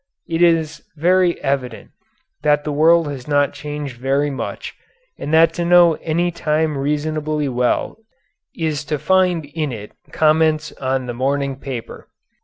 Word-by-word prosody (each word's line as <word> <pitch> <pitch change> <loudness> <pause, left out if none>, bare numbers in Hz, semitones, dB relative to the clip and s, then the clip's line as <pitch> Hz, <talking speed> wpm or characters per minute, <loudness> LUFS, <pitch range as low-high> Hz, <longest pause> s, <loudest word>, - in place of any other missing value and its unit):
It 165 0 -2
is 165 -3 +2
very 180 +2 +2
evident 135 -4 -3 0.5
that 150 -1 +2
the 150 - -3
world 160 +2 +4
has 130 -2 -8
not 145 -1 +2
changed 145 -3 -6
very 135 +3 0
much, 135 - -5 0.5
and 145 - -4
that 165 +1 +5
to 170 - -2
know 175 -1 +6
any 170 +2 0
time 155 -2 0
reasonably 150 +1 -1
well 125 -1 -1 0.6
is 155 -3 -2
to 150 +1 -2
find 180 0 +2
in 150 0 -3
it 105 -3 -8 0.2
comments 155 0 +2
on 130 -1 -2
the 120 - -4
morning 135 +2 -1
paper. 130 -3 -8
150 Hz, 145 wpm, -19 LUFS, 140-160 Hz, 0.6 s, know